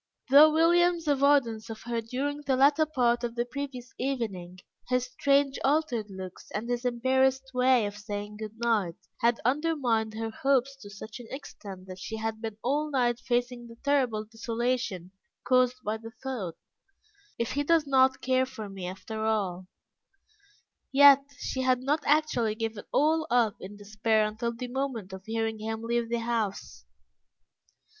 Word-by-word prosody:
Though 300 +3 +9
William's 340 +1 +3
avoidance 275 -6 +2
of 220 -1 -8
her 235 -1 -2
during 275 +6 -3
the 275 -2 +1
latter 285 +4 +4
part 245 -5 +1
of 235 -1 -3
the 240 0 0
previous 255 -1 -6
evening, 215 -9 -3 0.3
his 250 0 +1
strange 275 +2 +1
altered 275 -6 +1
looks, 190 -1 -9
and 215 +3 -3
his 245 0 -2
embarrassed 260 +2 +1
way 250 -2 +4
of 205 0 -5
saying 210 0 -6
good 215 0 -7
night, 220 -7 0 0.2
had 235 0 +2
undermined 250 -6 +1
her 225 0 -3
hopes 275 +2 +1
to 210 -7 -12
such 215 +4 -9
an 240 - -10
extent 200 -9 -9
that 185 0 -9
she 220 +4 -5
had 220 0 -3
been 220 -2 -5
all 295 +4 0
night 245 -4 +1
facing 245 -1 -2
the 230 - -12
terrible 255 -7 +1
desolation 225 -4 -2 0.3
caused 255 -1 +3
by 215 +1 -1
the 225 +1 -11
thought, 230 -11 -4 0.8
"If 235 - -2
he 285 +2 0
does 325 0 +3
not 265 -1 +3
care 260 0 +2
for 220 -5 -8
me 190 -2 -6
after 195 +4 -6
all," 190 -5 -1 1.2
yet 280 0 +8
she 260 - -3
had 255 -1 +2
not 295 +4 +1
actually 290 -8 +2
given 225 -2 -4
all 315 +2 +2
up 235 -4 +2
in 200 +2 -9
despair 215 +1 +1
until 220 +2 -2
the 235 +2 -6
moment 245 -7 -4
of 190 +1 -9
hearing 225 -1 -2
him 220 +1 -4
leave 235 0 -1
the 235 0 -1
house. 215 - -3
240 Hz, 160 wpm, -28 LUFS, 220-270 Hz, 1.2 s, Though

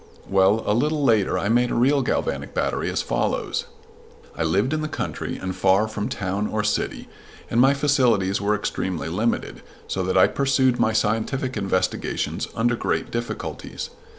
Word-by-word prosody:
Well, 100 +3 +3
a 105 - +2
little 150 +6 +1
later 110 -7 +3
I 95 - -1
made 120 +2 +3
a - - -2
real 135 +4 +3
galvanic 485 - -2
battery - - 0
as - - -1
follows: 470 +1 -1 0.7
I - - -5
lived 130 - +1
in 155 - 0
the 155 - -2
country - - -4
and 95 0 -4
far 95 +3 +3
from 110 -1 -4
town 100 +2 -2
or 105 -1 -1
city, 105 - -1 0.4
and 115 - +4
my 135 +2 +5
facilities 125 -10 +2
were 105 +1 +2
extremely 95 -5 -3
limited, 110 +7 -1 0.3
so 95 - -2
that 95 0 0
I 95 - +7
pursued 130 -2 +2
my 110 - +3
scientific 115 +5 0
investigations 95 -3 -1
under 120 +2 +2
great - - -2
difficulties. 120 0 -5
110 Hz, 165 wpm, -23 LUFS, 100-130 Hz, 0.7 s, I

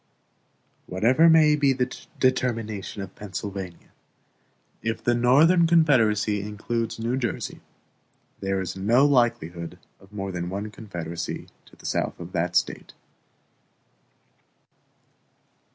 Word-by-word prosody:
Whatever 125 - +4
may 155 -2 +6
be 140 -2 +3
the 125 0 -2 0.2
determination 115 -6 -1
of 95 - -10
Pennsylvania, 95 -3 -7 0.9
if 110 0 -3
the 120 - +3
Northern 150 +9 +5
Confederacy 115 -11 +3
includes 110 +3 -3
New 115 +3 -1
Jersey, 120 -4 -3 0.8
there 95 0 -1
is 95 -1 -4
no 115 +8 +3
likelihood 90 - +1 0.2
of 95 +1 -20
more 100 -2 -4
than 90 -1 -4
one 100 +3 -4
confederacy 85 -7 -6 0.2
to - - -18
the - - -17
south - - -2
of - - -8
that - - -1
State. - - 0
110 Hz, 110 wpm, -25 LUFS, 95-130 Hz, 0.9 s, may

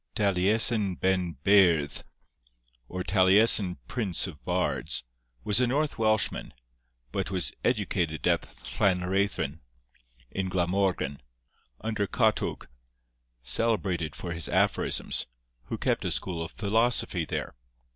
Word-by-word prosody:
Taliesin 100 +1 +2
Ben 90 -4 0
Beirdd, 90 -7 +4 0.9
or 90 0 -4
Taliesin 95 -1 +4
Prince 105 -8 0
of 75 -9 -9
Bards, - - -1 0.4
was 105 - +3
a 125 - +3
North 145 +1 -1
Welshman, 110 - 0 0.6
but 95 +4 -2
was 90 -8 -2
educated 90 -8 0
at - - +3 0.4
Llanreithin, 90 -5 +1 0.7
in 95 -1 -2
Glamorgan, 90 -5 0 0.6
under 110 -2 -1
Catwg, - - 0 0.8
celebrated 90 - 0
for 85 +6 -5
his 85 -1 -3
aphorisms, - - 0 0.4
who - - -4
kept - - 0
a - - -1
school 85 -3 -2
of 80 - -6
philosophy 110 -3 0
there. - - -4
95 Hz, 105 wpm, -28 LUFS, 85-105 Hz, 0.9 s, Beirdd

